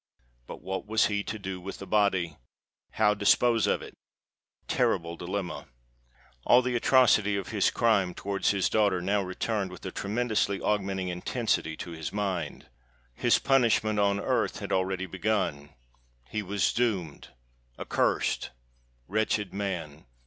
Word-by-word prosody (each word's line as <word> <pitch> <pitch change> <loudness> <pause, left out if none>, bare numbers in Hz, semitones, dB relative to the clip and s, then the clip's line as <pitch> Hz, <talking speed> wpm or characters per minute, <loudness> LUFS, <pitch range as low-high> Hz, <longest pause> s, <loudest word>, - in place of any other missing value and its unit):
But - - -9
what 95 +1 -4
was 110 +1 +3
he 105 -2 -1
to 110 - -4
do 95 -3 -6
with 95 +2 -7
the 100 - -8
body?—how 100 - -1
dispose 110 +2 +3
of - - 0
it? - - -10 0.7
Terrible 85 0 0
dilemma! 90 +1 -5 0.8
All 125 - +5
the 125 0 -1
atrocity 115 -5 +4
of 95 - -5
his 105 -3 +2
crime 100 -7 +2
towards 100 -1 -1
his 100 -2 +2
daughter 100 -4 +2
now 100 +3 +1
returned 95 +2 -2
with 90 -2 -11
a - - -4
tremendously 105 -2 -1
augmenting 95 -3 -1
intensity 90 -3 -1
to 85 - -7
his 80 -2 -5
mind. 95 -7 -3 0.5
His - - +3
punishment 115 -5 +2
on 100 0 +2
earth - - 0
had - - -6
already 95 0 0
begun:—he 70 - -4
was 100 0 0
doomed—accursed. - - -2 0.6
Wretched 105 -1 0
man! 85 -8 -4
100 Hz, 130 wpm, -28 LUFS, 90-105 Hz, 0.8 s, All